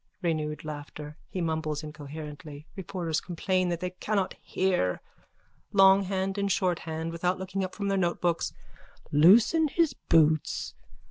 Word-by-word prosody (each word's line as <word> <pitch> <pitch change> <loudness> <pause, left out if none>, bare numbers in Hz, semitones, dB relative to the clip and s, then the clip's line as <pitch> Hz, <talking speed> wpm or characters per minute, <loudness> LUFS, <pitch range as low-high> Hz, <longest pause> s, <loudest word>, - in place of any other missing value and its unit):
_ - - -52 0.2
(Renewed 155 -3 -1
laughter. 150 0 -7
He 185 - -3
mumbles 160 -2 -2
incoherently. 150 0 -8
Reporters 175 -4 -2
complain 185 +1 0
that 170 -1 -2
they 180 0 -2
cannot 195 +1 -1
hear.) 180 - 0 0.7
LONGHAND 195 0 +4
AND 200 0 0
SHORTHAND: 165 -3 -1
(Without 180 +2 0
looking 190 +1 -3
up 185 - -5
from 200 -1 -3
their 195 -1 +1
notebooks.) 175 -1 0 0.6
Loosen 215 - +6
his 320 -1 +2
boots. 155 - +2
175 Hz, 130 wpm, -28 LUFS, 155-190 Hz, 0.7 s, Loosen